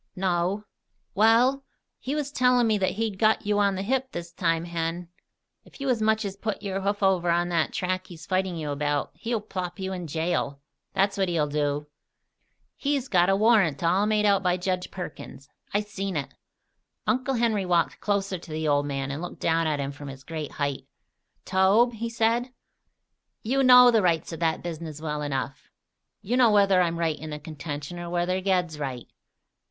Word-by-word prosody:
"No." 185 +2 0 0.5
"Wal, 235 +6 +4 0.4
he 275 +3 -3
was 290 -2 -2
tellin' 250 -3 +3
me 215 -2 +2
that 190 - +1
he'd 215 -2 -3
got 220 0 +3
you 205 0 +1
on 200 -1 +2
the 190 - -3
hip 260 +4 -1
this 170 0 -6
time, 165 -1 0
Hen. 170 0 -3 0.5
If - - -18
you 275 -1 -2
as 240 -3 +1
much 220 0 +2
as 195 -1 -4
put 205 0 -4
your 195 -1 -2
hoof 200 +1 -1
over 185 -3 +3
on 175 +1 +2
that 165 -2 +1
track 185 0 -2
he's 165 -2 -11
fighting 185 -1 0
you 150 -2 -3
about, 145 0 -1
he'll 230 -1 -2
plop 185 -4 -5
you 190 -1 -4
in 180 -2 -5
jail, 160 -2 -1 0.3
that's 195 +1 +1
what 190 -2 +2
he'll 165 -3 +1
do! 145 0 -1 0.9
He's 280 -2 -1
got 180 -4 +3
a 195 - +4
warrant 200 - +3
all 185 +5 +3
made 215 -1 +2
out 200 -1 +4
by 180 -1 +1
Jedge 180 0 -2
Perkins. 155 -6 -8 0.2
I 205 - +1
seen 195 -4 -4
it." 140 - -4 0.7
Uncle 260 +1 0
Henry 220 -5 +1
walked 170 -2 +1
closer 200 -2 -1
to 165 - -12
the 155 0 -2
old 145 0 +2
man 135 -1 -3
and 145 +3 -4
looked 175 - -7
down 165 0 +2
at 150 -2 0
him 140 0 -2
from 145 0 -10
his 135 -1 -9
great 155 -1 -6
height. 140 -2 -3 0.6
"Tobe," 200 +6 +4
he 230 +1 -4
said, 230 +2 +1 0.9
"you 265 +5 +1
know 250 -1 +8
the 225 -2 +4
rights 170 -3 +1
of 165 - -6
that 165 -1 0
business 160 -3 -6
well 150 -1 -3
enough. 140 -1 -4 0.5
You 240 +6 0
know 245 -3 +6
whether 200 -3 +4
I'm 170 -1 0
right 165 -2 -1
in 155 - -7
the 150 - -5
contention, 150 +1 -6
or 175 0 -6
whether 175 +2 0
Ged's 180 -5 0
right. 130 -4 -4
185 Hz, 190 wpm, -26 LUFS, 160-210 Hz, 0.9 s, know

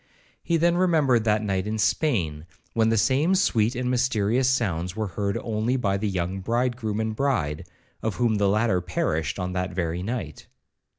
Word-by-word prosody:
He 170 - +1
then 170 +1 +2
remembered 150 -10 +3
that 105 0 +2
night 95 -1 -1
in 110 +1 -2
Spain, 90 - 0 0.3
when 115 -1 +2
the 115 - +2
same 145 - +3
sweet 120 - +2
and 125 0 -1
mysterious 125 0 +1
sounds 90 -8 -1
were 110 -2 -2
heard 100 +3 -2
only 115 +3 -1
by 100 -6 0
the 105 +1 -1
young 95 0 -2
bridegroom 115 0 -1
and 110 0 -2
bride, 90 - -1 0.3
of 110 -2 -2
whom 115 -3 +1
the 100 -1 +2
latter 105 -3 +2
perished 80 -2 -1
on 90 -1 -3
that 90 -1 -3
very 85 -1 -2
night. 95 -7 -5
110 Hz, 175 wpm, -25 LUFS, 95-125 Hz, 0.3 s, remembered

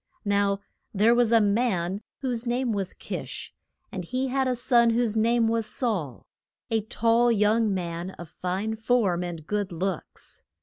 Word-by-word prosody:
Now 200 0 +1 0.3
there 215 +4 +5
was 240 -1 +3
a 230 - +6
man 200 -3 +1 0.2
whose 245 -3 0
name 245 0 0
was 195 -3 -1
Kish, - - -6 0.4
and 185 - -4
he 255 +9 -2
had 265 0 +1
a 255 - +1
son 235 -1 +4
whose 230 -1 +2
name 230 +1 +3
was 225 -1 0
Saul, 190 - -2 0.5
a 225 -1 +2
tall 230 +3 +2
young 215 0 +3
man 175 -1 -3
of 175 - -8
fine 190 +7 -3
form 220 -6 +1
and 170 -3 -6
good 205 +1 -2
looks. 180 0 -5
220 Hz, 160 wpm, -26 LUFS, 190-235 Hz, 0.5 s, a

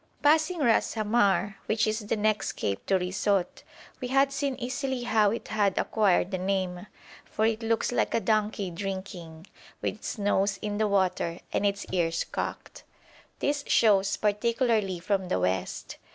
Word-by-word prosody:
Passing 315 +4 +4
Ras 235 -4 +2
Hamar, 205 -2 +2
which 215 0 +2
is 215 +1 0
the 215 +1 -2
next 215 0 0
cape 100 -1 -3
to 195 - +3
Risout, 185 0 -1 0.4
we 250 - -2
had 275 +2 +3
seen 275 -1 -1
easily 260 0 -3
how 220 -3 +3
it 230 +3 -4
had 205 -3 +1
acquired 195 -3 +2
the 185 - -2
name, 185 0 -2 0.4
for 215 - -1
it 225 0 0
looks 225 +1 0
like 245 - 0
a - - +3
donkey 215 -4 0
drinking, 180 -3 -6 0.3
with - - -1
its - - -6
nose 200 -1 +1
in 210 0 -2
the 215 - +2
water 185 -4 0
and 205 - +2
its 200 0 -2
ears 165 -2 0
cocked. - - -6 0.5
This 285 0 -1
shows 200 -3 +3
particularly 215 -2 +1
from 190 +1 -1
the 95 - 0
west. 90 0 -2
205 Hz, 160 wpm, -27 LUFS, 190-230 Hz, 0.5 s, Passing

